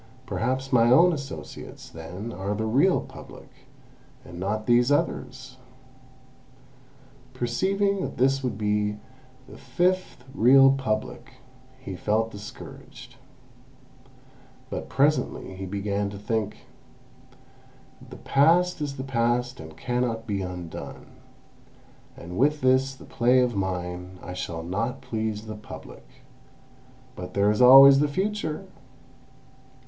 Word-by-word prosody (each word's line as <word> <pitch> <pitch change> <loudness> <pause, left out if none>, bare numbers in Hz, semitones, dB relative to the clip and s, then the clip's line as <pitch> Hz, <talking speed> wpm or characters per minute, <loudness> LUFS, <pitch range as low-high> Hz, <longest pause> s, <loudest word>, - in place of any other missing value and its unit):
Perhaps 130 +2 -2
my 120 -1 +5
own 170 +8 +6
associates, 140 -3 -8
then, 90 +8 -8
are 100 +2 -3
the 110 +2 -2
real 140 +12 +3
Public, - - -13 0.7
and 85 0 -10
not 105 +3 -2
these 120 +3 +3
others!" 145 - -2 1.8
Perceiving 195 +11 0
that - - -5
this 135 +2 +2
would 120 -5 -2
be 105 0 0 0.5
the - - -13
fifth 175 0 -1
real 135 +1 +6
Public, 120 -2 -3 0.5
he 100 -7 -7
felt 110 +4 0
discouraged. 105 0 -11 1.5
But - - -5
presently 145 -8 0
he 95 0 -6
began 100 +1 -2
to 100 - -8
think: 105 0 -3 1.4
"The - - -10
past 165 +5 +3
is 145 -1 -4
the 130 - -4
past 125 -1 0
and 80 0 -11
cannot 120 -2 -2
be 100 -3 -2
undone, 90 -3 -8 1.1
and 90 +3 -7
with 150 +3 +2
this 130 +1 +2
play 125 +2 +3
of 125 -2 +1
mine 90 -1 -4
I 90 - -7
shall 85 -2 -5
not 115 +9 -3
please 110 -1 -3
the 110 - -6
Public; 105 0 -11 1.1
but 90 0 -8
there 100 +1 +3
is 105 - 0
always 135 +2 +9
the 150 - +3
future! 190 0 -3
120 Hz, 115 wpm, -25 LUFS, 100-135 Hz, 1.8 s, always